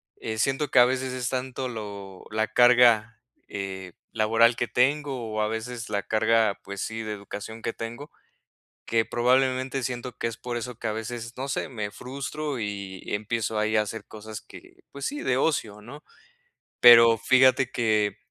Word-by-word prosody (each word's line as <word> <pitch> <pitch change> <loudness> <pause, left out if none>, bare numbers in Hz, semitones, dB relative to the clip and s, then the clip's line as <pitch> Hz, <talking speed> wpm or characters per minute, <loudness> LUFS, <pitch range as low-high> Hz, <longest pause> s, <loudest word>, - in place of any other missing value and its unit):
eh, 110 -1 -5
siento 135 +5 0
que - - +6
a 120 - +8
veces 130 0 -1
es 125 -1 -3
tanto 130 0 -3
lo 100 -4 -8
la 110 0 0
carga, 120 -2 +4 0.3
eh, 95 -2 -6 0.2
laboral 115 +2 +4
que 120 - -2
tengo 135 -2 0
o 110 - 0
a 105 - 0
veces 115 +1 -5
la 100 -1 -1
carga, 110 -1 +2
pues 100 -1 -7
sí, 110 0 -4
de 110 -1 -5
educación 105 +2 -8
que 115 - -3
tengo, 120 +6 -7 0.8
que 115 -1 +1
probablemente 130 +1 +1
siento 125 0 -5
que - - -2
es 115 -1 -4
por 120 0 -5
eso 125 +1 -5
que 115 - -4
a - - -1
veces, 115 +1 -6
no 135 +2 -4
sé, 135 - -2
me 105 -5 -5
frustro 140 +2 -5
y 100 -3 -5
empiezo 110 0 -2
ahí 110 0 +1
a 105 - +4
hacer 110 +2 -7
cosas 110 0 -9
que, - - -15
pues 140 - -8
sí, 290 +1 -4
de 125 - +1
ocio, 110 -8 -1
¿no?, 140 +7 -11 0.8
pero 115 -1 +8
fíjate 130 +1 +4
que 105 -3 +1
115 Hz, 175 wpm, -26 LUFS, 110-125 Hz, 0.8 s, a